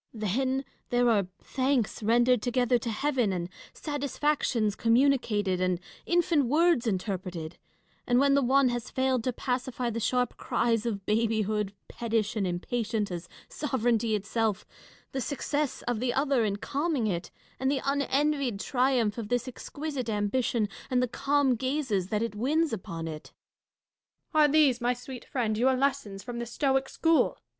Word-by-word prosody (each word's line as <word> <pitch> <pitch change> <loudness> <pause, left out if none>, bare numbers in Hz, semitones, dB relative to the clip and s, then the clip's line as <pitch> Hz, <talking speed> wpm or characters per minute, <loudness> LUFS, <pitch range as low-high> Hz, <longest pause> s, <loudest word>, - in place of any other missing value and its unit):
Then, 260 +6 0 0.2
there 245 0 +3
are 200 -4 +2 0.2
thanks 260 -5 0
rendered 240 +2 +3
together 245 0 +2
to 235 - -4
heaven, 245 -1 +1
and 175 -1 -3 0.2
satisfactions 285 -6 -1
communicated, 230 -6 +2
and 185 -1 +1 0.3
infant 345 -4 +3
words 305 -1 +3
interpreted; 185 -5 -3 0.5
and 245 -1 +3
when 275 +1 +4
the 280 - +4
one 270 +1 +4
has 240 -1 -3
failed 260 -2 +1
to 255 - +1
pacify 250 -1 -2
the 230 - -3
sharp 245 +2 0
cries 230 -1 0
of 200 -4 -3
babyhood, 215 -2 +1 0.2
pettish 225 -2 -1
and 200 -3 0
impatient 210 +3 -2
as 175 0 -6 0.2
sovereignty 235 -6 0
itself, 210 0 -1 0.5
the 265 - -2
success 285 +2 -2
of 240 -2 -1
the 245 0 -1
other 275 -3 +2
in 200 -1 0
calming 280 +4 -1
it, 175 -4 -2 0.3
and 265 +1 +1
the 275 -1 0
unenvied 280 -4 +1
triumph 245 -3 +1
of 215 -2 -5
this 245 +1 0
exquisite 280 -1 -5
ambition, 215 +1 0 0.2
and 250 -1 +2
the - - +1
calm 280 +2 +2
gazes 255 -7 -1
that 210 +2 0
it 230 - -3
wins 290 +7 +1
upon 165 -5 -5
it. 155 -1 -8 1.0
Catharine. 305 -1 +5
Are - - -1
these, 280 -5 +4
my 245 +1 +1
sweet 250 0 -9
friend, 235 -6 -1
your 260 +2 +4
lessons 255 -8 -1
from 240 -1 -5
the 235 - -4
Stoic 270 +2 0
school 325 -1 +2
245 Hz, 155 wpm, -28 LUFS, 215-270 Hz, 1.0 s, Catharine